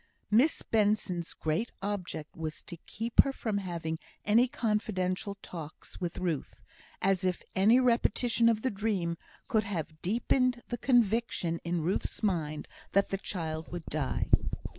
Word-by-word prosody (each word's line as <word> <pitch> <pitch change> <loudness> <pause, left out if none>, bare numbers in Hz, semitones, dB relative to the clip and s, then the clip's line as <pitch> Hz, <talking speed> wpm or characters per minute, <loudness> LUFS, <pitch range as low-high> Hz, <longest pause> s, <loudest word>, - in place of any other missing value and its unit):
Miss 250 +9 +4
Benson's 205 -5 +1
great 160 +9 -1
object 185 -6 -4
was 155 -1 -5
to 170 - -8
keep 230 +2 +4
her 275 - -1
from 220 -6 -2
having 170 -4 -3 0.3
any 230 +4 +5
confidential 200 -4 -1
talks 160 -1 -9
with 175 -2 -3
Ruth; 170 -6 -3 0.4
as 190 -1 +2
if 185 -1 0
any 215 +6 +6
repetition 235 -1 +3
of 220 -1 +1
the 260 - +1
dream 195 -5 -1 0.3
could 220 -5 +2
have 160 -5 -4
deepened 240 +4 +1
the 240 - -3
conviction 230 -8 +2
in 170 -1 -1
Ruth's 180 +6 -2
mind 160 -7 -1 0.3
that 200 0 +3
the 195 - -1
child 160 -5 -4
would 175 -2 -5
die. 145 -3 -2
195 Hz, 140 wpm, -30 LUFS, 170-225 Hz, 0.4 s, any